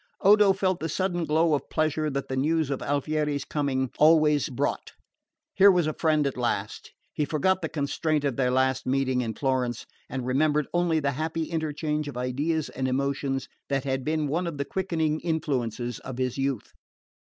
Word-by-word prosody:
Odo 205 0 +6
felt 190 -2 0
the 160 - -3
sudden 175 0 -1
glow 160 +1 +2
of 145 - -1
pleasure 155 0 0
that 140 -1 -3
the 130 - -3
news 155 +2 +1
of 135 - -2
Alfieri's 145 0 -1
coming 135 -4 -1
always 155 -2 +5
brought. 125 - -2 0.6
Here 200 +1 +7
was 180 -4 +3
a 155 - -1
friend 155 -2 +1
at 140 - -1
last! 120 -1 -2 0.2
He 150 - 0
forgot 175 +6 +1
the 160 - -3
constraint 150 +1 -1
of 140 -4 0
their 125 -1 +1
last 130 0 +1
meeting 130 -1 +1
in 115 -3 -3
Florence, 130 -3 -1 0.2
and 130 -1 -4
remembered 150 +3 +2
only 175 -2 +2
the 140 -2 0
happy 160 +4 -2
interchange 155 -1 -2
of 140 - -6
ideas 145 +6 -1
and 130 0 -3
emotions 135 0 -1 0.2
that 135 -2 0
had 135 -1 -2
been 155 +1 0
one 170 +5 -1
of 165 -4 -5
the 140 - -2
quickening 160 -4 -1
influences 125 -8 -2
of 130 -2 -8
his 130 -1 -1
youth. 135 -4 -2
145 Hz, 180 wpm, -26 LUFS, 130-160 Hz, 0.6 s, Here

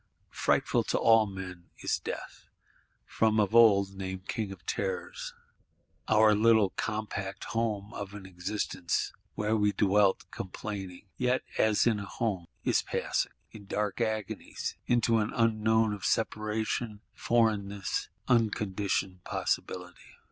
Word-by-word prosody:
Frightful - - +2
to - - 0
all 115 -1 +5
men 90 -3 -8
is - - -1
Death; - - -7 0.6
from 110 -1 +2
of 105 0 +2
old 100 -4 +6
named 95 -1 -6
King 105 -3 -2
of 95 -3 -11
Terrors. 95 -2 -3 0.7
Our 110 0 +6
little 110 -2 +4
compact 105 -3 -3
home 110 -1 -2
of 100 0 -6
an 100 -2 -9
Existence, 90 -1 -2 0.2
where 105 +1 +1
we 105 -1 +2
dwelt 100 -1 +3
complaining, 95 -1 -6
yet 125 +1 +1 0.2
as 110 -1 +4
in 115 -3 +3
a 100 - -5
home, 100 -8 -2 0.2
is - - +3
passing, - - -1 0.2
in 100 -3 -12
dark 105 +2 -1
agonies, 110 -3 -3
into 115 -1 +3
an 105 - 0
Unknown 110 -1 +3
of 100 -2 -7
Separation, 110 0 -1
Foreignness, 105 -4 0 0.2
unconditioned 100 -5 0
Possibility. 90 -1 -3
105 Hz, 125 wpm, -30 LUFS, 95-110 Hz, 0.7 s, old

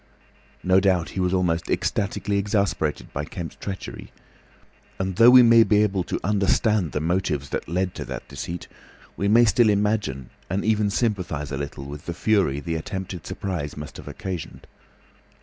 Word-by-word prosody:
No 95 +1 +4
doubt 95 -4 +1
he - - -5
was 90 -1 +1
almost 90 -3 0
ecstatically 100 0 -1
exasperated 100 -6 -1
by 70 - -2
Kemp's 85 +2 -7
treachery, 95 -2 -7 0.9
and 95 -1 -3
though 115 +2 +8
we 125 0 +9
may 115 -1 +7
be 105 -1 +4
able 95 -3 0
to - - -3
understand 100 - +2
the 75 - -1
motives 80 -4 -1
that - - -4
led 90 +1 -1
to - - -6
that - - -7
deceit, 85 0 -6 0.5
we 100 - -1
may 115 +3 +6
still 110 +2 +4
imagine 100 - 0 0.2
and 95 +3 -1
even 105 -1 +2
sympathise 90 - -1
a 70 - -2
little 70 -1 -6
with 75 +1 -9
the 85 - -3
fury 95 -8 +2
the 85 +2 -4
attempted 95 +1 -6
surprise 85 -8 -4
must 75 0 -8
have - - -11
occasioned. 90 -4 -6
95 Hz, 165 wpm, -24 LUFS, 80-105 Hz, 0.9 s, we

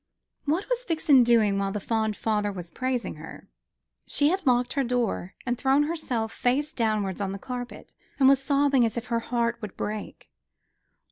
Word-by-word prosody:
What 320 +7 0
was - - -1
Vixen 315 - +4
doing 220 -4 +3
while 195 0 -1
the 210 - -3
fond 220 0 -1
father 210 -2 0
was 175 -3 -7
praising 255 -2 -2
her? - - -11 0.6
She 290 0 +2
had 370 -2 -1
locked 245 -1 +3
her 275 - +1
door, 235 -6 -1
and 245 -1 0
thrown 275 +2 +3
herself 260 -8 -2
face 290 +5 0
downwards 215 - -1
on 195 -1 -2
the - - -5
carpet, 245 +3 -7 0.3
and 265 - +6
was 275 0 +5
sobbing 280 -2 +3
as 225 0 0
if 235 - -3
her 230 - +2
heart 235 0 -1
would 210 -3 -8
break. 210 0 -6
245 Hz, 180 wpm, -26 LUFS, 215-275 Hz, 0.6 s, and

